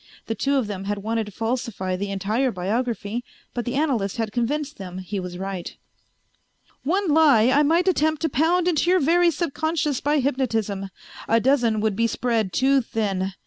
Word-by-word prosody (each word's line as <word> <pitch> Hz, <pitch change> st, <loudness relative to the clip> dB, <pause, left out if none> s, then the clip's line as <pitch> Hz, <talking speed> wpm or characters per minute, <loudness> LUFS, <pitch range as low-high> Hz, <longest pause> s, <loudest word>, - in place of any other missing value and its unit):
The 225 Hz, -, -2 dB
two 275 Hz, +5 st, 0 dB
of 265 Hz, -4 st, +1 dB
them 195 Hz, -2 st, -5 dB
had 205 Hz, 0 st, -3 dB
wanted 225 Hz, 0 st, -1 dB
to -, -, -8 dB
falsify 225 Hz, -4 st, -2 dB
the 200 Hz, +2 st, -3 dB
entire 215 Hz, +7 st, 0 dB
biography, 225 Hz, +3 st, -2 dB, 0.3 s
but 240 Hz, -, -3 dB
the 245 Hz, -, -2 dB
analyst 250 Hz, -10 st, 0 dB
had 225 Hz, -2 st, -2 dB
convinced 285 Hz, +6 st, -2 dB
them 185 Hz, -2 st, -7 dB
he 190 Hz, +2 st, -4 dB
was 180 Hz, -1 st, -6 dB
right. 190 Hz, -2 st, -5 dB, 1.1 s
"One 370 Hz, +5 st, 0 dB
lie 285 Hz, -7 st, +5 dB
I 285 Hz, +2 st, +4 dB
might 335 Hz, +5 st, +2 dB
attempt 315 Hz, -3 st, +1 dB
to 320 Hz, -, +2 dB
pound 330 Hz, +6 st, +2 dB
into 345 Hz, 0 st, +2 dB
your 370 Hz, 0 st, +5 dB
very 345 Hz, +4 st, +4 dB
subconscious 315 Hz, -3 st, -1 dB
by 295 Hz, +1 st, +2 dB
hypnotism; 225 Hz, -8 st, -1 dB, 0.4 s
a 230 Hz, -, +4 dB
dozen 235 Hz, -4 st, +2 dB
would 215 Hz, -2 st, 0 dB
be 230 Hz, +2 st, +2 dB
spread 225 Hz, -4 st, -1 dB
too 270 Hz, +8 st, +3 dB
thin. 195 Hz, -5 st, -2 dB
240 Hz, 180 wpm, -23 LUFS, 205-290 Hz, 1.1 s, lie